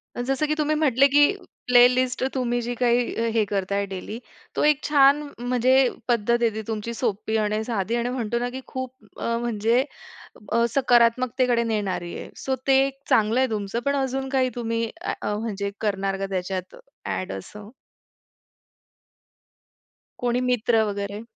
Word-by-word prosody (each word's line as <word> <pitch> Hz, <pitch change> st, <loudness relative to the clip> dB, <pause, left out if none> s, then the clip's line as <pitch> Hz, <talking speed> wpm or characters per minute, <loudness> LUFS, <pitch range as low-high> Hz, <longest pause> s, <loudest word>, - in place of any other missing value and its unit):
अ, -, -, -3 dB
जसं, 270 Hz, +4 st, 0 dB
की 305 Hz, -, 0 dB
तुम्ही 310 Hz, 0 st, 0 dB
म्हटले, 275 Hz, -3 st, +4 dB
की 290 Hz, +3 st, +5 dB, 0.4 s
प्लेलिस्ट 250 Hz, +1 st, +4 dB
तुम्ही 245 Hz, -2 st, 0 dB
जी 240 Hz, +1 st, -3 dB
काही 240 Hz, -1 st, +1 dB
हे 225 Hz, -1 st, +3 dB
करताय 200 Hz, 0 st, -1 dB
डेली, 195 Hz, +4 st, -6 dB, 0.4 s
तो -, -, +1 dB
एक 300 Hz, -1 st, +3 dB
छान 285 Hz, 0 st, +5 dB, 0.2 s
म्हणजे 250 Hz, +1 st, +2 dB, 0.3 s
पद्धत 235 Hz, -1 st, +2 dB
आहे 235 Hz, -, +4 dB
ती 220 Hz, -, -3 dB
तुमची, 225 Hz, +1 st, -3 dB
सोपी 220 Hz, -2 st, -2 dB
आणि 215 Hz, 0 st, 0 dB
साधी 225 Hz, -1 st, -2 dB
आणि 240 Hz, +1 st, -1 dB
म्हणतो 235 Hz, -2 st, -2 dB
ना, 245 Hz, +1 st, -2 dB
की 260 Hz, +2 st, -7 dB
खूप 260 Hz, -1 st, -5 dB, 0.3 s
अ, 230 Hz, 0 st, -1 dB
म्हणजे 235 Hz, +1 st, +1 dB, 0.7 s
अ, 235 Hz, 0 st, +3 dB
सकारात्मकतेकडे 245 Hz, -1 st, +3 dB
नेणारी 205 Hz, -6 st, -2 dB
आहे. -, -, -8 dB
सो 265 Hz, -, -2 dB
ते 270 Hz, -, +6 dB
एक 270 Hz, 0 st, -9 dB
चांगलंय 230 Hz, +4 st, +3 dB
तुमचं, 210 Hz, +1 st, -2 dB
पण 280 Hz, -, +1 dB
अजून 265 Hz, 0 st, -2 dB
काही 260 Hz, -1 st, +2 dB
तुम्ही 230 Hz, -1 st, -2 dB
अ, -, -, -2 dB, 0.2 s
म्हणजे 205 Hz, -2 st, -3 dB
करणार 195 Hz, -2 st, -1 dB
का 195 Hz, -, -2 dB
त्याच्यात 185 Hz, 0 st, -3 dB, 0.3 s
अ‍ॅड 185 Hz, -, -3 dB
असं? 205 Hz, -, -9 dB, 2.5 s
कोणी 245 Hz, 0 st, 0 dB
मित्र 230 Hz, -2 st, +2 dB
वगैरे. 200 Hz, 0 st, -4 dB
235 Hz, 150 wpm, -24 LUFS, 210-255 Hz, 2.5 s, ते